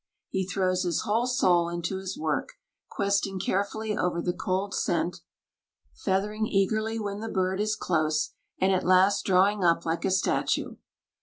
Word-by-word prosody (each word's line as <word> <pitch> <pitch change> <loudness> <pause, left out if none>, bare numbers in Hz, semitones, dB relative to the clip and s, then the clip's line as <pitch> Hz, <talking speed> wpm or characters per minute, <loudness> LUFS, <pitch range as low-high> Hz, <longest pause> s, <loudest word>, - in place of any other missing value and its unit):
He 190 -1 -2
throws 185 -1 0
his 175 -4 0
whole 225 +4 +1
soul 175 -9 +3
into 170 +2 -3
his 190 0 -5
work, 160 - -2 0.4
questing 200 -1 0
carefully 205 +3 -1
over 180 -4 0
the 175 +1 -1
cold 190 +3 -2
scent, 170 +1 -1 0.7
feathering 210 +3 -1
eagerly 215 +3 0
when 205 -2 -4
the 225 +1 -5
bird 190 0 0
is 215 0 0
close, 155 -2 0 0.3
and 190 +1 +3
at 185 - +1
last 190 +2 +4
drawing 195 +1 +3
up 170 -1 +3
like 165 +1 -1
a - - +1
statue. 190 +1 0
190 Hz, 155 wpm, -27 LUFS, 180-205 Hz, 0.7 s, last